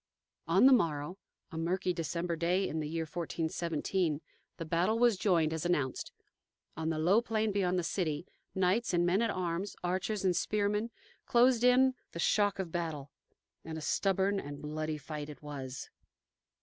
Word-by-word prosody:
On - - +5
the 270 - +8
morrow, 165 - 0 0.3
a 160 - -5
murky 180 +2 0
December 170 +1 -2
day, 175 +4 +1
in 160 - -3
the 150 -1 -3
year 165 +1 -2
1417, 165 0 -2 0.4
the 165 - -5
battle 175 +7 +1
was 240 -2 +4
joined, 170 -5 +2
as 160 - -3
announced. 150 -7 -1 0.6
On 160 0 -2
the 160 - -1
low 180 +8 +4
plain 220 -2 0
beyond 185 -2 +1
the 180 - 0
city, 165 -2 -2 0.3
knights 190 +3 +1
and 175 0 +3
men 180 +5 +2
at 230 - +1
arms, 185 +1 -2
archers 190 +3 -1
and 180 -2 +3
spearmen, 210 +3 0 0.4
closed 240 0 +4
in 255 +1 +5 0.2
the 170 - -6
shock 205 +3 +2
of 185 -4 -4
battle, 160 -5 -4 0.5
and 160 0 -6
a - - -6
stubborn 195 +5 +1
and 145 -4 -7
bloody 155 +1 -3
fight 150 +1 -6
it 150 - -11
was. 135 -3 -7
175 Hz, 165 wpm, -32 LUFS, 160-200 Hz, 0.6 s, the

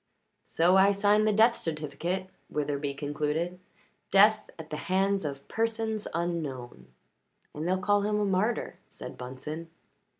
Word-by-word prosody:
"So 175 +3 +4
I 195 +1 +6
signed 205 +2 +3
the - - +4
death 225 +3 +5
certificate," 165 +4 -3 0.2
Witherbee 145 -1 -2
concluded. 150 +5 -2 0.5
"Death 210 +2 +5
at 160 -1 -10
the 150 - -3
hands 195 +1 +2
of 140 -2 -5
persons 225 -1 -1
unknown." 145 - -4 0.7
"And 155 +3 -4
they'll 185 +1 +2
call 205 +2 +2
him 210 +1 0
a 210 - +1
martyr," 200 +4 0
said - - -8
Bunsen. 150 +6 -7
175 Hz, 135 wpm, -29 LUFS, 150-205 Hz, 0.7 s, I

